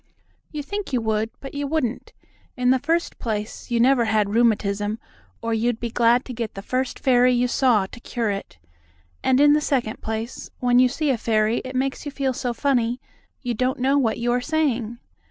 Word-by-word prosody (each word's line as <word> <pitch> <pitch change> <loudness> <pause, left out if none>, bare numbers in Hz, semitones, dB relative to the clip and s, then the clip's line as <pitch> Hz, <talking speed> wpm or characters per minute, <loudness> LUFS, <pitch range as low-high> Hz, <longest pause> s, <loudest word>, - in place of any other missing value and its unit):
"You 300 -2 -4
think 405 +3 -5
you 255 - +1
would, 220 0 0
but 270 - -9
you 285 0 -3
wouldn't. 275 -6 -2 0.5
In 250 0 +3
the 260 - +3
first 330 +5 -1
place, 215 0 -4
you 240 -1 +1
never 245 0 +4
had 210 -2 +1
rheumatism, 210 -2 +1 0.5
or 230 0 -1
you'd 230 +1 0
be 235 -1 -4
glad 240 +2 +3
to 255 - -6
get 230 -2 -4
the 195 - -7
first 255 +2 -2
fairy 250 -1 +4
you 245 0 +2
saw 240 -5 +3
to 215 - -11
cure 235 -3 -2
it. 195 - -6 0.7
And 260 0 +3
in 290 0 +6
the 300 - +3
second 250 -7 -1
place, 220 +2 -5
when 245 0 +3
you 255 0 +5
see 295 +2 0
a 245 - -1
fairy 215 0 +1
it 260 0 -7
makes 265 +1 -1
you 290 - -5
feel 275 -1 -1
so 250 -1 -2
funny 245 -1 0 0.4
you 245 -2 -1
don't 255 +3 0
know 265 +2 +2
what 250 -6 +2
you 240 +1 0
are 245 +1 +1
saying. 250 -6 -1
245 Hz, 205 wpm, -23 LUFS, 225-265 Hz, 0.7 s, in